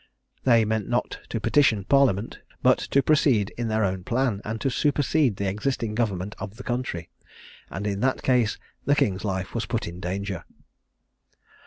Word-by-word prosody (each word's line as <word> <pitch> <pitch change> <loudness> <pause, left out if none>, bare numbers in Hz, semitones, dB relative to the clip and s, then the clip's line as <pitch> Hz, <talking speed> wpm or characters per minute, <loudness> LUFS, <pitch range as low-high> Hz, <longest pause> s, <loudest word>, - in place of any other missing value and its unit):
They 115 -3 +5
meant 110 -1 -1
not - - -1
to - - -2
petition 120 -9 +3
Parliament, 120 -4 +2 0.2
but - - +5
to 140 - +1
proceed 125 -8 +3
in 120 -1 -2
their 110 -1 +1
own 95 -1 -2
plan, 115 -2 0
and 110 +1 -4
to 135 - +1
supersede 145 -2 +2
the 100 +1 -2
existing 105 +2 -1
government 105 -3 -1
of 95 +2 -6
the 130 - -9
country: 120 -9 -3 0.6
and, 100 - -5
in 100 -1 -1
that 130 +3 0
case, 125 -5 +2 0.3
the 145 - +3
king's 95 -8 +1
life 95 -2 -3
was 115 - -2
put 115 -2 -2
in 85 +1 -7
danger. 95 0 -3
110 Hz, 170 wpm, -25 LUFS, 100-130 Hz, 0.6 s, They